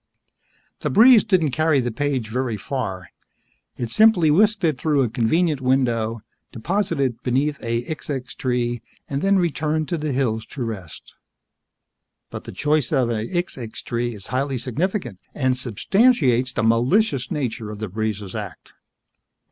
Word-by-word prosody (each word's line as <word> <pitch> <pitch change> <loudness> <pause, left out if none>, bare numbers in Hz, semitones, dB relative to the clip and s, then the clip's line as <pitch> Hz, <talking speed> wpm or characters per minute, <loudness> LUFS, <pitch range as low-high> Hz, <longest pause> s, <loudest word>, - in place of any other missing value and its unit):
The - - -2
breeze 235 +1 +7
didn't 180 -9 +2
carry 155 +1 +2
the 120 -1 -1
page 130 -3 -2
very 120 -1 -2
far. 95 - -4 0.7
It 120 -2 -4
simply 200 - +5
whisked 205 +5 +3
it 155 -6 +1
through 150 -4 +2
a 120 - -1
convenient 145 +6 +1
window, 120 -4 +1 0.3
deposited 140 - 0
it - - -45
beneath 140 +3 0
a 115 0 -1
xixxix 140 -4 -5
tree 120 -2 -1 0.3
and 140 0 -3
then 195 0 +3
returned 155 -2 0
to 170 -3 -1
the 150 -1 -2
hills 120 -4 0
to 130 - -5
rest. 100 -8 -7 1.2
But - - -7
the - - -7
choice 150 -3 0
of 130 -5 +2
a 110 0 -2
xixxix 135 -11 -4
tree 120 0 -2
is 100 - -9
highly 135 +1 0
significant 130 - -2 0.2
and 130 -2 +1
substantiates 130 - +2
the 125 - -2
malicious 125 - +2
nature 120 -6 -3
of 105 - -7
the 110 +1 -4
breeze's 105 -1 -3
act. - - -8
130 Hz, 150 wpm, -22 LUFS, 115-155 Hz, 1.2 s, breeze